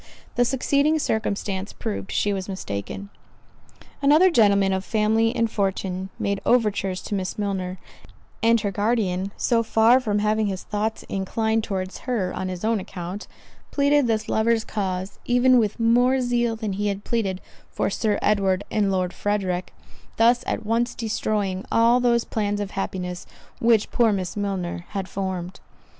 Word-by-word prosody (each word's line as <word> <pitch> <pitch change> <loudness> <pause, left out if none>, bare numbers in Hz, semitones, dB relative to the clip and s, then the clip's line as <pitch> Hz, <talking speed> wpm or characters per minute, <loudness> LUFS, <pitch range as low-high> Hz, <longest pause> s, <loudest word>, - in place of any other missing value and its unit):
The 245 - +2
succeeding 280 +4 +2
circumstance 205 -6 -2
proved 210 -3 -5
she 205 - +1
was 190 0 -4
mistaken. 190 - -5 0.9
Another 305 +6 +5
gentleman 200 - +4
of 190 0 -1
family 220 +3 +2
and 230 - +2
fortune 190 -2 -2
made 200 0 -1
overtures 205 -6 +1
to - - -5
Miss 190 -2 -2
Milner; 190 -3 -2 0.6
and 230 +1 +4
her 200 -2 -1
guardian, 200 -2 0
so 235 -1 +2
far 225 +2 +4
from 215 -5 -1
having 215 +1 +1
his 190 -2 -4
thoughts 215 +1 -2
inclined 220 +3 -1
towards 190 -3 -4
her 200 -7 0
on 185 - -3
his 185 +2 -4
own 225 -1 +2
account, 185 +2 -7 0.4
pleaded 285 -1 +3
this 220 -1 0
lover's 225 0 +2
cause 190 -2 -3
even 245 +1 +4
with 215 0 -1
more 245 +3 +4
zeal 240 -2 +1
than 220 -3 -3
he 205 +2 -1
had 200 0 -2
pleaded 200 -6 -1 0.3
for - - -1
Sir 210 0 0
Edward 195 -2 +2
and 205 -2 +1
Lord 185 -1 0
Frederick; 190 -3 -2 0.5
thus 240 +2 +4
at 220 - -2
once 230 +2 0
destroying 210 -4 -1
all 235 +2 +4
those 235 -1 +2
plans 205 -2 -2
of 205 -1 -4
happiness 180 -2 -4 0.3
which 230 -2 +3
poor 230 -2 +3
Miss 185 -3 -2
Milner 190 -4 -3
had 195 -2 -4
formed. 190 -2 -4
210 Hz, 155 wpm, -24 LUFS, 190-230 Hz, 0.9 s, Another